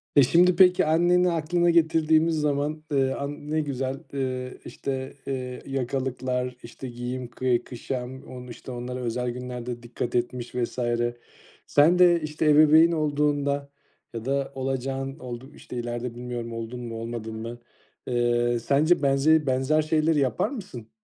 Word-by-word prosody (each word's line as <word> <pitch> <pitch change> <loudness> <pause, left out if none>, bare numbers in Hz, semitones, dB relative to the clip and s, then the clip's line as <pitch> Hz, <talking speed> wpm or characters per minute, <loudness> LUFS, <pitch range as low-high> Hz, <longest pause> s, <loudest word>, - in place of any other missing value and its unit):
E, 140 - +8
şimdi 175 +7 +5
peki, 185 +1 +6
anneni 175 +3 +3
aklına 170 +2 +1
getirdiğimiz 160 -1 +3
zaman, 150 +1 -1
eee, 135 -2 +2
an 145 +1 -5
ne 155 0 +2
güzel, 135 -2 -3
eee, 130 -2 -3
işte, 130 -1 -4
eee, 125 -2 -4
yakalıklar, 130 -1 -2
işte 125 +2 -8
giyim, 125 +1 -5
kı 120 0 0
kuşam, 130 +1 -5
onu, 125 -1 -10
işte, 120 +2 -9
onlara 125 +1 -5
özel 125 0 -2
günlerde 125 -1 -6
dikkat 120 0 -4
etmiş 120 0 -2
vs. 125 0 -2 0.9
Sen 160 +5 +4
de, 175 -2 +6
işte, 155 +1 -2
ebeveyn 155 +2 +7
olduğunda 145 -2 0 0.4
ya 115 -1 -6
da 140 +1 -1
olacağın 135 0 -3
oldu 125 +2 -8
işte, - - -9
ileride, 120 0 -4
bilmiyorum, 120 -1 -5
oldun 115 +2 -5
mu, 120 -2 -6
olmadın 115 -1 -5
mı? 115 +2 -6 0.5
Eee, 120 -1 +1
sence 145 +8 +3
benze 145 +3 +4
benzer 130 +4 +2
şeyleri 155 0 +2
yapar 135 - +1
mısın? 180 - -8
135 Hz, 145 wpm, -26 LUFS, 125-155 Hz, 0.9 s, E